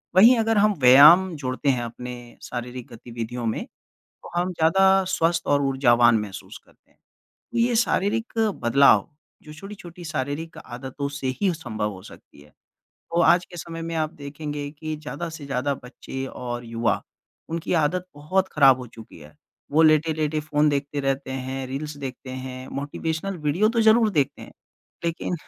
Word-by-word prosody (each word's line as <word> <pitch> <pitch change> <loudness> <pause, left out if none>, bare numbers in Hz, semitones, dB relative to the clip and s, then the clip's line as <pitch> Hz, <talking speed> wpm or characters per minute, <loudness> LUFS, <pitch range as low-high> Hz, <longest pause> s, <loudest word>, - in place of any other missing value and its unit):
वहीं 230 +6 +8
अगर 225 -1 +1
हम 210 +1 +4
व्यायाम 155 +8 +8
जोड़ते 130 0 -2
हैं, 125 -2 +1
अपने 125 +1 -7 0.3
शारीरिक 125 0 -6
गतिविधियों 115 +1 -6
में, 110 - -2 0.4
तो - - -16
हम 180 +1 -1
ज़्यादा 190 +4 +4
स्वस्थ 165 +1 +1
और 145 0 +3
ऊर्जावान 120 -4 +4
महसूस 105 -2 -8
करते - - -28
हैं। - - -34 0.5
तो 240 - -4
ये 235 +1 +2
शारीरिक 225 0 0 0.3
बदलाव 140 +7 +5 0.3
जो 150 - -11
छोटी-छोटी 175 -1 -10
शारीरिक 150 +2 -4
आदतों 130 +3 -6
से 140 -2 -5
ही 195 -3 +3
संभव 110 -9 -4
हो 95 -2 -10
सकती 85 - -15
हैं, 75 0 -19 0.6
तो 170 +1 +1
आज 175 +1 +5
के 175 - -13
समय 165 +1 -7
में 165 0 -4
आप 155 -1 0
देखेंगे 145 0 -6
कि 155 +1 -6
ज़्यादा 155 +3 -6
से 160 -2 -9
ज़्यादा 140 +1 -1
बच्चे 135 +1 -7
और 120 -2 -6
युवा 115 -2 -1 0.5
उनकी 165 0 -3
आदत 180 +5 -1
बहुत 185 +6 0
खराब 135 -3 +6
हो 125 - -7
चुकी 110 -5 -14
है। 75 0 -15 0.4
वो 155 +2 +5
लेटे-लेटे 155 -1 +2
फ़ोन 150 0 +1
देखते 145 0 -1
रहते 135 -1 -2
हैं, 130 0 -4
रील्स 145 +3 -5
देखते 130 -1 -7
हैं, 130 0 -7
मोटिवेशनल 160 +6 -4
वीडियो 185 +9 +3
तो 230 0 +1
ज़रूर 220 0 +5
देखते 145 -8 -1
हैं, - - -12 0.5
लेकिन 170 +1 -2
145 Hz, 165 wpm, -24 LUFS, 130-170 Hz, 0.6 s, वहीं